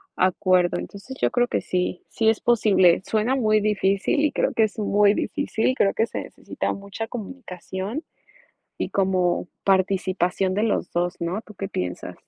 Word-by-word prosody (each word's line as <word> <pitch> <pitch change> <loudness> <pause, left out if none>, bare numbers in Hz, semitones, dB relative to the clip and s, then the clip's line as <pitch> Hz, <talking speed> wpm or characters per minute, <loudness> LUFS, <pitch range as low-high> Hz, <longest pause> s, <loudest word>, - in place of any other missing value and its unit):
acuerdo. 185 -1 +2
Entonces, 250 +7 -8
yo - - +2
creo 245 0 +1
que - - 0
sí, 180 0 -2
sí 220 -1 +1
es 220 - +1
posible. 200 -7 +4
Suena 225 +4 +1
muy 215 -4 +3
difícil, 205 +3 +1
y 300 -1 +2
creo - - 0
que 225 - +3
es 220 +1 -2
muy 205 -1 +4
difícil, 255 0 -1
creo 200 -6 +2
que 225 - +1
se - - -4
necesita - - -4
mucha 200 +3 -6
comunicación, 210 - -6 0.8
y - - -2
como 185 -2 +1 0.2
participación 190 -1 +1
de 210 - 0
los 220 -5 0
2, 175 +1 -1
¿no? 170 +5 -2
¿Tú 215 - -14
qué 195 - -4
piensas? 90 - -4
200 Hz, 165 wpm, -24 LUFS, 185-220 Hz, 0.8 s, posible